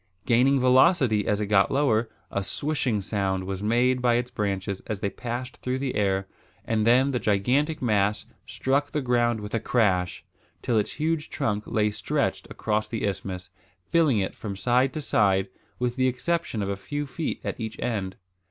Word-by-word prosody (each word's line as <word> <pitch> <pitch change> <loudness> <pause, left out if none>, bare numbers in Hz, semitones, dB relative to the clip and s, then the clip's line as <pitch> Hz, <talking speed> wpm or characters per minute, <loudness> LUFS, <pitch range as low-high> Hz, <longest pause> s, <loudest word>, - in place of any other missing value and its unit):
Gaining 130 +4 +4
velocity 130 - +4
as 105 - +1
it 105 - 0
got 100 -1 +3
lower, 120 -5 +2 0.2
a 100 - -1
swishing 130 -2 -1
sound 95 -2 -1
was 95 0 -4
made 125 +4 +2
by 120 -1 +3
its 125 +1 -1
branches 100 -4 -2
as 105 -3 -3
they 100 -1 -2
passed 125 +2 -5
through 130 0 -2
the 135 -1 -2
air; 95 -1 0 0.4
and 110 -1 +1
then 130 +4 +5
the 125 - 0
gigantic 130 +10 +1
mass 105 -3 +1 0.2
struck 140 +2 0
the 150 - -2
ground 120 -2 +2
with 105 0 -7
a 115 - +1
crash, 95 -7 +1 0.4
till 115 -3 +2
its 105 - -2
huge 160 0 -1
trunk 105 -7 -2
lay 105 -1 +1
stretched - - -1
across 105 0 -1
the 110 0 -3
isthmus, 95 -2 -4 0.4
filling 160 -8 +4
it 95 -2 -1
from 100 -3 -6
side 125 +6 +2
to 155 - -3
side, 95 -7 +2 0.3
with 125 0 -2
the 130 0 +3
exception 130 -3 -1
of 100 - -3
a 100 - -1
few 145 +10 -4
feet 155 +3 -4
at - - -4
each 110 -1 -5
end. 100 -6 -2
115 Hz, 180 wpm, -26 LUFS, 100-130 Hz, 0.4 s, then